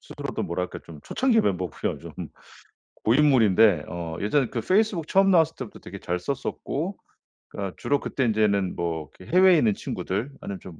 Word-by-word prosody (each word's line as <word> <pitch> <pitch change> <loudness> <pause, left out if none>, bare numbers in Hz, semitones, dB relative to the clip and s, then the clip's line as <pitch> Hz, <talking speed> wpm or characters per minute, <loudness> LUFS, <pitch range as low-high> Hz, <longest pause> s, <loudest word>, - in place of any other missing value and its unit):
스스로도 - - -5
뭐랄까 90 +2 -3
좀 80 -3 -11
초창기 245 -4 +2
멤버고요. 90 -4 -2
좀 - - -10 0.9
고인물인데 110 - +4
어 85 -2 -5
예전에 125 +5 +1
그 115 - -3
페이스북 185 - +1
처음 195 0 +4
나왔을 165 -3 +4
때부터 125 -5 -8
되게 100 +1 -9
잘 90 +1 -2
썼었고, 140 - -4 0.5
그니까 100 -3 -5
주로 145 0 0
그때 130 - -2
인제는 105 -4 +1
뭐 80 -3 -3
그 90 - -14
해외에 185 0 +6
있는 110 -7 +2
친구들, 110 +9 -4
아니면 100 -2 -6
좀 85 -5 -11
110 Hz, 380 characters per minute, -25 LUFS, 90-150 Hz, 0.9 s, 해외에